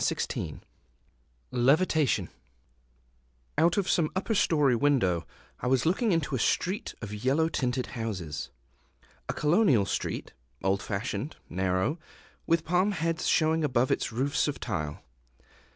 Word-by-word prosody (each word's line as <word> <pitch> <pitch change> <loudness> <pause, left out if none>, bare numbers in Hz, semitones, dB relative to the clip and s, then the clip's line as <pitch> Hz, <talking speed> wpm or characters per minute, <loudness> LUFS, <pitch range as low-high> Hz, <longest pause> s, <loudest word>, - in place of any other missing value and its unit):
Levitation 140 - +2 1.3
[Decoration] - - -39
OUT 170 +3 +4
of 195 -3 +1
some 160 -4 +2
upper 195 +4 0
story 150 - +3
window 115 - +2 0.3
I - - -3
was 130 -1 +2
looking 200 +7 +2
into 165 -5 0
a - - -1
street 185 - 0
of 105 -1 -5
yellow 150 +5 +2
tinted 125 -4 -1
houses, 90 - -4 0.8
a - - 0
colonial 150 - +3
street, - - -3 0.3
old 95 +1 +1
fashioned, 115 +9 -3
narrow, 95 - 0 0.5
with 165 -1 +2
palm 180 +4 +2
heads 165 -2 -1
showing 160 0 +3
above 130 -3 +2
its - - 0
roofs 135 +7 0
of 145 - -3
tile. 75 -10 -4
140 Hz, 125 wpm, -28 LUFS, 110-165 Hz, 1.3 s, OUT